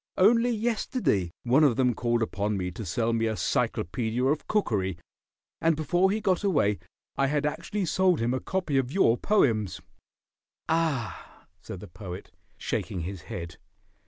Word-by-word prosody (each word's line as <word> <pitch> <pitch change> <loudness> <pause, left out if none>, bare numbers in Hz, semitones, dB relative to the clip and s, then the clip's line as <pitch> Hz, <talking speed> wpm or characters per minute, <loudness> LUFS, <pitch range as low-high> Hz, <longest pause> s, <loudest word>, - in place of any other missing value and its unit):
Only 230 +5 +5
yesterday 225 - 0
one 130 +5 +4
of 135 -6 +4
them 125 -1 +2
called 120 0 0
upon 105 -1 -1
me 90 -1 -2
to 105 +5 -7
sell 115 -1 0
me 115 0 +1
a 110 -1 -2
Cyclopedia 115 +7 -1
of 145 +3 0
Cookery, 100 - 0 0.6
and 165 -1 +3
before 175 +5 +2
he 210 +3 0
got 195 -3 +1
away 140 - +2 0.4
I 135 - +3
had 145 +1 0
actually 195 +6 -2
sold 185 0 +2
him 115 +2 +1
a 130 - 0
copy 180 -6 -1
of 130 -1 -2
your 150 -10 +4
poems." 115 - +1 0.9
"Ah," 160 -8 -2 0.2
said 90 - -8
the - - -9
Poet, 90 +1 -9 0.3
shaking 90 - -3
his 90 +1 -5
head. 85 0 -6
130 Hz, 160 wpm, -27 LUFS, -, 0.9 s, Only